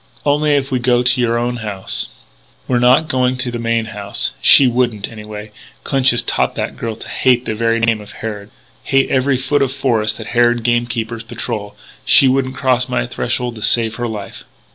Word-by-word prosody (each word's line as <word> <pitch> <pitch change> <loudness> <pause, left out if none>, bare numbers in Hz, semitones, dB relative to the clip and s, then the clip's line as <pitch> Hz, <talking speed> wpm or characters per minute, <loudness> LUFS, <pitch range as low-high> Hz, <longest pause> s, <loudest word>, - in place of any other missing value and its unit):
Only, 145 +1 +2
if 140 -1 -1
we 130 - 0
go 120 0 +2
to 125 0 +2
your 115 -1 +1
own 120 +1 -2
house 105 -4 -4 0.3
" - - -34
"We're 125 - +1
not 125 +6 +4
going 130 -2 0
to 130 -1 -2
the 120 - -4
main 115 -1 0
house. 105 -2 -4
She 140 - +7
wouldn't, 120 -4 0
anyway. 105 -1 -9 0.3
Clinch 135 -2 +2
has 120 -1 +2
taught - - -1
that - - -3
girl 115 -1 -4
to - - -11
hate 125 -1 +1
the 110 - -2
very 115 +1 0
name 115 -2 +1
of 105 - -12
Harrod 105 -2 -7 0.3
hate 135 0 +1
every 135 0 +2
foot 135 +3 0
of 135 -2 +1
forest 110 -5 0
that 110 - -7
the 110 - -9
Harrod 120 -1 +2
game 120 0 +1
keepers 115 -1 -4
patrol. 110 -3 -6 0.3
She 135 - +6
wouldn't 130 0 0
cross 130 -1 +1
my - - -1
threshold 125 - -3
to - - -10
save 110 -1 +3
her 120 - -2
life." 105 -3 -7
120 Hz, 210 wpm, -17 LUFS, 110-130 Hz, 0.3 s, She